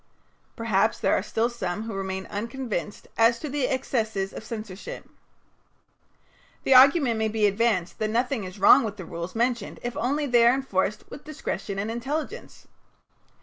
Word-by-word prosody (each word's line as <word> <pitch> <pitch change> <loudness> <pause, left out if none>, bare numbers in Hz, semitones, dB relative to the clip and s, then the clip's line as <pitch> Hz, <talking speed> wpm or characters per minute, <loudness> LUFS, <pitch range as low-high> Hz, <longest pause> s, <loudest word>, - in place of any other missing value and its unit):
Perhaps 225 -2 +1
there - - +1
are - - +1
still 220 +3 0
some 215 -4 -4
who 225 -1 -6
remain 190 -1 -4
unconvinced 225 -2 -5
as 230 +1 +5
to 300 - -6
the 275 -2 0
excesses 220 -7 -1
of - - -8
censorship. 215 -4 -7 1.6
The 270 - +4
argument 260 -2 +6
may 220 - +1
be 215 -1 +1
advanced 200 -3 +1
that 215 - 0
nothing 240 +1 0
is 185 +1 -8
wrong 200 +4 +7
with 210 -2 -4
the 185 - -7
rules 170 +3 -6
mentioned 235 -2 -1
if 240 0 -4
only 285 +5 0
they 240 -3 +5
are 240 - +5
enforced 210 -6 -1
with - - -9
discretion 205 -9 -5
and 205 +3 -2
intelligence. 295 - -5
225 Hz, 160 wpm, -26 LUFS, 200-250 Hz, 1.6 s, wrong